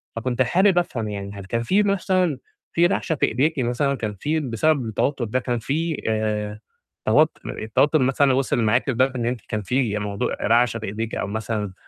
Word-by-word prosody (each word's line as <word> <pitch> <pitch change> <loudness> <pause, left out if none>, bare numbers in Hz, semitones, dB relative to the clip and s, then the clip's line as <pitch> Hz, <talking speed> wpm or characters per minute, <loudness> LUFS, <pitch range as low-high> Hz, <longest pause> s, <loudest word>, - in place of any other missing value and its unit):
فكنت 120 +2 -1
حابب 185 +8 +3
أفهم 115 -11 -1
يعني 100 -1 -5
هل 100 -1 -8
كان 115 +4 -1
في 195 - +3
مثلًا 185 -6 +1 0.4
في 170 +1 +4
رعشة 180 -3 -1
في - - +2
إيديكِ 140 +5 0
مثلًا 130 +3 0
كان 110 -4 -4
في 155 +2 0
بسبب 135 +1 +1
التوتر 125 +4 -1
ده، 120 +4 0
كان 120 -1 -2
في 160 +6 -2
آآ، 105 -1 -1 0.5
توت - - +4
التوتر 145 +8 +1
مثلًا 135 +1 +3
وصل 130 -2 +1
معاكِ 115 +5 +2
لدرجة 130 +1 +1
إن 120 -2 -2
أنتِ 120 -2 -2
كان 105 - -2
في 105 0 0
موضوع 100 -1 -2
رعشة 115 +1 +3
في 110 - -6
إيديكِ 110 +3 -4
أو - - -2
مثلًا 105 -2 -3
120 Hz, 185 wpm, -23 LUFS, 110-145 Hz, 0.5 s, في